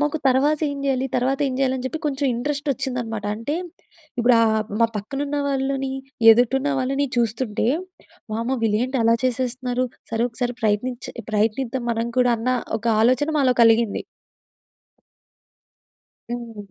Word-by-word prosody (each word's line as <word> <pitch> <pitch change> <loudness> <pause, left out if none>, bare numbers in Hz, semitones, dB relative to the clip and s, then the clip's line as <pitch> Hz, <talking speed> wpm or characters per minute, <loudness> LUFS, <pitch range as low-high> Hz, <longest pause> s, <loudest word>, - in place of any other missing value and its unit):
మాకు 295 +1 0
తర్వాత 285 +4 +3
ఏం 285 - -5
జేయాలి? 265 -1 +1
తర్వాత 260 +2 +1
ఏం 260 - -2
జేయాలి? 265 -1 +2
అని 255 - -6
చెప్పి 320 - -4
కొంచెం 280 0 0
ఇంట్రెస్ట్ 290 +4 -2
వచ్చిందనమాట. 235 -4 -4
అంటే 230 +7 -3 0.6
ఇప్పుడు 240 +1 +5
ఆహ్, 220 -1 +3 0.2
మా 230 - +6
పక్కన 215 +7 -5
ఉన్న 290 +1 -2
వాళ్ళని, 270 -1 -1 0.4
ఎదుటున్న 255 +5 +3
వాళ్ళని 275 +2 0
చూస్తుంటే, 230 -1 0 0.7
"వామ్మో! 230 +4 -1
వీళ్ళు 210 -1 +2
ఏంటి 260 +1 -2
అలా 230 +1 +4
చేసేస్తున్నారు? 255 0 -1 0.3
సరే! 225 0 0
ఒకసారి 245 +1 -2
ప్రయత్నిచే 230 +4 -1 0.2
ప్రయత్నిద్దాం 230 +4 0
మనం 230 +1 -1
కూడా" 245 -1 +4
అన్న 235 +3 -1 0.3
ఒక 225 - -7 0.2
ఆలోచన 255 +6 +3
మాలో 260 -3 +4
కలిగింది. 225 -1 +3 2.3
హ్మ్. 225 -5 -7
250 Hz, 140 wpm, -22 LUFS, 230-270 Hz, 2.3 s, మా